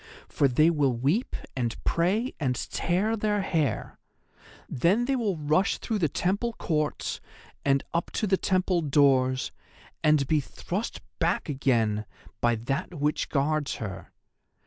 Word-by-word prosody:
For 140 - +2
they 155 +6 +4
will 140 -6 +2
weep 145 - 0 0.2
and 120 -3 -1
pray 200 +9 +1
and 130 -4 0 0.2
tear 195 +6 +1
their 210 -1 0
hair. 155 - -1 0.7
Then 190 - +2
they 270 +1 +1
will 215 -8 0
rush 155 +6 +2
through 220 -3 -2
the 160 -5 +2
temple 200 - 0
courts 155 -7 -2 0.4
and 135 -1 +2
up 170 +1 0
to - - 0
the 195 -1 +3
temple 185 -2 +1
doors, 135 -3 +3 0.5
and 150 -2 +4
be 155 +3 +2
thrust 185 - -4 0.2
back 170 -1 0
again 115 -6 +1 0.3
by 120 0 +2
that 135 +9 -3
which 150 0 0
guards 150 0 0
her. 95 -4 -7
155 Hz, 140 wpm, -27 LUFS, 135-185 Hz, 0.7 s, they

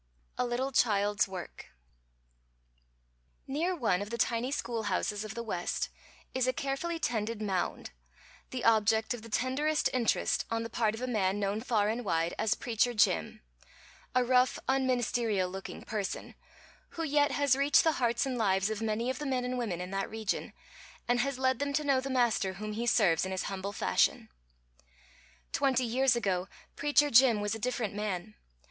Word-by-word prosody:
_ - - -42 0.3
A - - 0
LITTLE 255 +3 -1
CHILD'S 205 -4 +2
WORK 185 -2 -8 1.8
Near 330 +7 -1
one 220 - +1
of 205 - -5
the 235 - -4
tiny 235 +2 0
schoolhouses 215 -5 -2
of 215 0 -7
the 235 - -4
West 180 -6 -2 0.4
is 255 -1 +1
a 255 - +2
carefully 280 +6 -2
tended 230 -7 -2
mound, 195 -4 -2 0.6
the 255 -2 -5
object 220 0 +3
of 240 - -7
the 230 - -11
tenderest 280 +7 0
interest 245 -3 +1
on 230 0 -1
the 230 - -7
part 220 -2 +1
of 235 - -7
a - - -1
man 205 -4 0
known 205 +2 -1
far 220 -4 +1
and 230 +3 -1
wide 165 -4 0
as 220 0 +2
"Preacher 240 +1 0
Jim," 80 - +1 0.7
a 255 - +4
rough, 250 +1 +3
unministerial 240 -7 +1
looking 190 0 -7
person, 210 -4 -4 0.6
who 330 - -1
yet 290 -1 +3
has 285 -2 +3
reached 280 +2 +4
the 320 -4 +1
hearts 235 +3 +2
and 255 -2 -2
lives 195 -1 +2
of 220 0 -4
many 225 +3 0
of 260 - -6
the 295 - -3
men 255 -2 0
and 250 0 -2
women 220 -9 -2
in 180 +1 -5
that 195 0 -2
region, 220 -2 -3 0.6
and 245 0 +2
has 275 +1 0
led 260 -1 +1
them 285 0 -1
to 305 +2 +1
know 275 -3 +2
the 270 - -5
Master 235 -7 +1
whom 215 +3 -5
he 235 +3 -3
serves 190 -9 +3
in 190 - -3
his 190 - -2
humble 195 0 -4
fashion. 90 - +1 1.2
Twenty 260 -2 +2
years 250 +2 +2
ago 190 -5 -1 0.3
Preacher 295 0 +3
Jim 235 -2 +6
was 205 +1 -1
a 225 - -4
different 235 -3 -2
man. 210 -1 -3
230 Hz, 180 wpm, -30 LUFS, 205-260 Hz, 1.8 s, Jim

